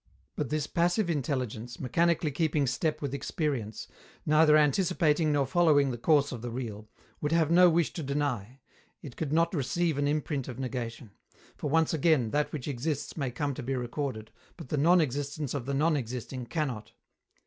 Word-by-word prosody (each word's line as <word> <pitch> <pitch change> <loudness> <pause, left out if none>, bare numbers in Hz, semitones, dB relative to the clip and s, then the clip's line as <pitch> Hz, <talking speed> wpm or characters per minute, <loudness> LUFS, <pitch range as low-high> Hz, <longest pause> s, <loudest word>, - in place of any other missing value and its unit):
But 145 -5 -2
this 150 0 -1
passive 175 +4 +1
intelligence, 125 -5 -3
mechanically 165 +3 +1
keeping 150 0 +1
step 140 +5 -1
with 140 -2 -3
experience, 140 -7 -3 0.4
neither 155 0 +5
anticipating 155 0 +2
nor 145 -2 +2
following 145 -2 +3
the 120 - -4
course 145 +1 +3
of 120 -4 -6
the 120 - -4
real, 110 -3 -6 0.3
would 150 - -1
have 165 -1 +2
no 180 +1 +7
wish 170 -1 +1
to 165 - -5
deny. 135 -4 -3 0.4
It 135 -5 -9
could 155 -4 -3
not 165 +3 +2
receive 155 +1 0
an 145 - +1
imprint 145 -2 -1
of 125 - -7
negation; 120 -4 -5 0.4
for, 150 - -4
once 160 +2 +2
again, 150 -7 +2
that 150 0 0
which 145 -5 -5
exists 145 +2 -3
may 140 -5 -2
come 140 +3 -2
to 140 - -6
be 135 +2 -2
recorded, 125 -3 -4 0.3
but - - -10
the - - 0
non 170 +5 +5
existence 145 0 -3
of 135 -3 -4
the 140 - -1
non 155 +3 +2
existing 125 -1 -5
cannot. 130 -9 -3
145 Hz, 180 wpm, -29 LUFS, 125-155 Hz, 0.4 s, no